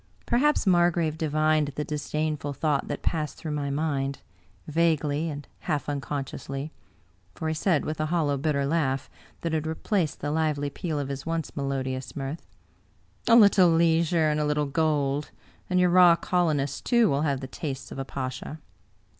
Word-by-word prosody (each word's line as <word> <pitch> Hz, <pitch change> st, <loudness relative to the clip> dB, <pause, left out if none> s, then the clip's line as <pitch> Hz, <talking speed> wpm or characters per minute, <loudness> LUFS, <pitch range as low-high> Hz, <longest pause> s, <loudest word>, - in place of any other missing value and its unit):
Perhaps 285 Hz, +4 st, +2 dB
Margrave 175 Hz, -4 st, +3 dB
divined 155 Hz, -1 st, +1 dB
the 150 Hz, -, -2 dB
disdainful 150 Hz, 0 st, -2 dB
thought 145 Hz, -1 st, 0 dB
that -, -, -5 dB
passed 155 Hz, -3 st, -1 dB
through 155 Hz, -, -5 dB
my 145 Hz, -1 st, -2 dB
mind, 140 Hz, -2 st, -1 dB, 0.5 s
vaguely 155 Hz, -1 st, +1 dB
and 145 Hz, -1 st, -7 dB
half 150 Hz, -6 st, -2 dB
uncon 145 Hz, -1 st, -3 dB
sciously; 135 Hz, +3 st, -6 dB, 0.6 s
for 160 Hz, -, -4 dB
he 160 Hz, -, 0 dB
said 160 Hz, -1 st, +1 dB
with 155 Hz, 0 st, -4 dB
a 155 Hz, -, 0 dB
hollow, 155 Hz, -4 st, +1 dB
bitter 140 Hz, 0 st, 0 dB
laugh 140 Hz, -3 st, 0 dB, 0.3 s
that 165 Hz, -1 st, -2 dB
had 160 Hz, 0 st, -1 dB
replaced 160 Hz, 0 st, -1 dB
the 145 Hz, -, -2 dB
lively 150 Hz, -2 st, 0 dB
peal 155 Hz, +1 st, -3 dB
of 140 Hz, -2 st, -3 dB
his 140 Hz, +2 st, -5 dB
once 165 Hz, -2 st, -3 dB
melodious 130 Hz, -2 st, -3 dB
mirth: 140 Hz, +3 st, -5 dB, 0.4 s
" -, -, -33 dB
A 230 Hz, -, +7 dB
little 200 Hz, -5 st, +7 dB
leisure 165 Hz, 0 st, +3 dB
and 150 Hz, -, 0 dB
a 150 Hz, -, +1 dB
little 150 Hz, 0 st, +1 dB
gold, 145 Hz, -1 st, 0 dB, 0.4 s
and 180 Hz, 0 st, +2 dB
your 180 Hz, -1 st, +4 dB
raw 180 Hz, -1 st, +7 dB
colonist, 155 Hz, -6 st, 0 dB
too, 235 Hz, -2 st, +4 dB
will 140 Hz, -4 st, +1 dB
have 140 Hz, -3 st, 0 dB
the 130 Hz, -, -6 dB
tastes 135 Hz, 0 st, -6 dB
of -, -, -6 dB
a -, -, -1 dB
pasha." 130 Hz, +4 st, -5 dB
150 Hz, 170 wpm, -26 LUFS, 140-165 Hz, 0.6 s, A